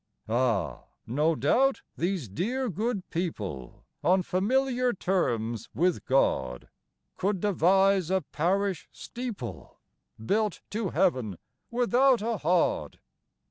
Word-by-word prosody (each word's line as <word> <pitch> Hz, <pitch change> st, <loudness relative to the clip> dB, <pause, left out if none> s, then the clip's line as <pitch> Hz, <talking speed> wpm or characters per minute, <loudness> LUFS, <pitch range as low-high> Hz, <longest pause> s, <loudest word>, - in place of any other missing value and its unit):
Ah, 115 Hz, -6 st, 0 dB, 0.2 s
no 150 Hz, +7 st, +1 dB
doubt 255 Hz, -, +2 dB
these 175 Hz, -, -1 dB
dear 240 Hz, -, -2 dB
good 210 Hz, +1 st, -2 dB
people 105 Hz, -, -4 dB, 0.2 s
On 185 Hz, +1 st, +4 dB
familiar 250 Hz, +7 st, +1 dB
terms 120 Hz, -, -1 dB
with 180 Hz, +3 st, +1 dB
God, 65 Hz, -, +1 dB, 0.5 s
Could 195 Hz, 0 st, 0 dB
devise 190 Hz, -1 st, +3 dB
a 190 Hz, 0 st, +2 dB
parish 185 Hz, +3 st, 0 dB
steeple 195 Hz, -, -7 dB, 0.5 s
Built 210 Hz, -, 0 dB
to 215 Hz, -2 st, -1 dB
heaven 125 Hz, -, +1 dB, 0.3 s
without 245 Hz, 0 st, +3 dB
a 230 Hz, 0 st, -1 dB
hod. 175 Hz, +1 st, +1 dB
185 Hz, 100 wpm, -28 LUFS, 130-215 Hz, 0.5 s, On